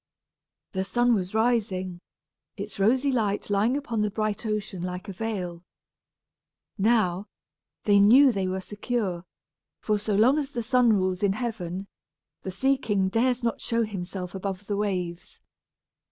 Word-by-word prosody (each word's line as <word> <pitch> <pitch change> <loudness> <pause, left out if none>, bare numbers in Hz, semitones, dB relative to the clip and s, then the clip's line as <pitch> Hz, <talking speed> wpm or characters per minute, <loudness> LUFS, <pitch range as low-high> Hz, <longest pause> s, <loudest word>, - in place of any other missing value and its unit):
The 190 -1 -1
sun 240 +5 +2
was 190 -1 -1
rising, 200 -6 0 0.6
its 205 0 -7
rosy 255 +7 +3
light 210 -5 -1
lying 215 +7 +2
upon 235 -6 -2
the 210 - +1
bright 215 +1 -2
ocean 210 -4 -3
like 180 +3 -5
a 195 - -5
veil. 185 -5 -4 1.1
Now, 205 -3 +2 0.6
they 205 -1 +5
knew 255 +7 +7
they 195 -4 -1
were 190 +1 -2
secure, 205 -3 -3 0.5
for 210 -1 0
so 210 0 -1
long 250 +8 +5
as 280 -2 -3
the 240 -4 -4
sun 245 0 +4
rules 185 -2 0
in 200 -2 +2
heaven, 200 -5 -4 0.6
the - - -5
sea 265 +9 +1
king 200 -6 0
dares 245 +4 +1
not 230 - -1
show 230 0 0
himself 185 -3 -5
above 195 0 -4
the 205 - -2
waves. 180 -4 -3
205 Hz, 150 wpm, -26 LUFS, 190-230 Hz, 1.1 s, knew